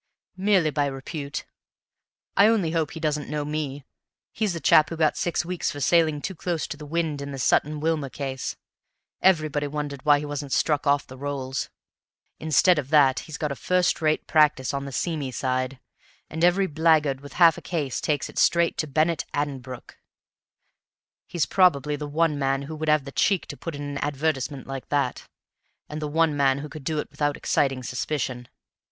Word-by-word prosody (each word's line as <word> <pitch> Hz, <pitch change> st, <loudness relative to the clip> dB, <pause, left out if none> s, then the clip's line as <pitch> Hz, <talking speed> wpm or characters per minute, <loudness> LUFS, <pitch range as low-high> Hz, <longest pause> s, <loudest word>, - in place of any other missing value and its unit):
"Merely 190 Hz, -5 st, +3 dB
by 145 Hz, -1 st, +1 dB
repute. 140 Hz, +1 st, -5 dB, 0.9 s
I 200 Hz, -, +6 dB
only 205 Hz, -8 st, +2 dB
hope 160 Hz, -3 st, 0 dB
he 160 Hz, -, -8 dB
doesn't 150 Hz, -2 st, -2 dB
know 150 Hz, 0 st, -2 dB
me. 145 Hz, -2 st, -4 dB, 0.5 s
He's 215 Hz, -4 st, -1 dB
the 170 Hz, -, -4 dB
chap 155 Hz, -1 st, +5 dB
who 165 Hz, -, -5 dB
got 155 Hz, -2 st, +2 dB
six 175 Hz, 0 st, -1 dB
weeks 180 Hz, 0 st, -2 dB
for 145 Hz, -, -6 dB
sailing 155 Hz, 0 st, +3 dB
too 190 Hz, -, -3 dB
close 170 Hz, -1 st, -2 dB
to -, -, -4 dB
the 150 Hz, 0 st, -10 dB
wind 160 Hz, -2 st, -1 dB
in 140 Hz, 0 st, -5 dB
the 135 Hz, -, -6 dB
Sutton 150 Hz, +3 st, +1 dB
Wilmer 155 Hz, -3 st, -1 dB
case; 135 Hz, -1 st, -4 dB, 0.7 s
everybody 155 Hz, -5 st, +2 dB
wondered 145 Hz, -2 st, -5 dB
why 145 Hz, -1 st, +5 dB
he 145 Hz, -, -4 dB
wasn't 145 Hz, -1 st, -4 dB
struck 150 Hz, -1 st, +1 dB
off 140 Hz, 0 st, +3 dB
the 130 Hz, 0 st, -12 dB
rolls. 135 Hz, -2 st, -3 dB, 0.7 s
Instead 160 Hz, +2 st, +4 dB
of 140 Hz, -2 st, -5 dB
that 140 Hz, -4 st, +5 dB
he's 155 Hz, -2 st, -8 dB
got 150 Hz, -2 st, -2 dB
a -, -, -3 dB
first 180 Hz, +4 st, +1 dB
rate 155 Hz, -1 st, +1 dB
practice 150 Hz, -5 st, +3 dB
on 140 Hz, 0 st, -3 dB
the 140 Hz, -, -6 dB
seamy 150 Hz, 0 st, -2 dB
side, 130 Hz, +1 st, -2 dB, 0.5 s
and 160 Hz, +1 st, -3 dB
every 180 Hz, +3 st, +4 dB
blackguard 155 Hz, -4 st, +2 dB
with 145 Hz, -1 st, -11 dB
half 170 Hz, -3 st, +6 dB
a -, -, -9 dB
case 150 Hz, -7 st, -3 dB
takes 145 Hz, -2 st, 0 dB
it -, -, -5 dB
straight 170 Hz, 0 st, +3 dB
to 155 Hz, -, 0 dB
Bennett 155 Hz, +3 st, +1 dB
Addenbrooke. 135 Hz, -4 st, -5 dB, 1.3 s
He's 170 Hz, -3 st, 0 dB
probably 150 Hz, -6 st, +3 dB
the 145 Hz, 0 st, -5 dB
one 150 Hz, 0 st, +1 dB
man 135 Hz, 0 st, 0 dB
who 155 Hz, +3 st, -7 dB
would 155 Hz, 0 st, -2 dB
have 150 Hz, -2 st, +3 dB
the 140 Hz, -, -7 dB
cheek 195 Hz, +5 st, +1 dB
to -, -, -5 dB
put 165 Hz, -3 st, -6 dB
in 145 Hz, -, -6 dB
an 145 Hz, 0 st, -4 dB
advertisement 145 Hz, -2 st, -2 dB
like 135 Hz, -1 st, -7 dB
that, 140 Hz, -4 st, -1 dB, 0.6 s
and 150 Hz, +1 st, -6 dB
the 150 Hz, -, -2 dB
one 160 Hz, 0 st, +2 dB
man 135 Hz, -1 st, +3 dB
who 150 Hz, +2 st, -6 dB
could 155 Hz, -3 st, -10 dB
do 155 Hz, +1 st, -1 dB
it 150 Hz, -, -4 dB
without 145 Hz, 0 st, -1 dB
exciting 135 Hz, -2 st, 0 dB
suspicion. 125 Hz, 0 st, -3 dB
150 Hz, 190 wpm, -25 LUFS, 140-160 Hz, 1.3 s, I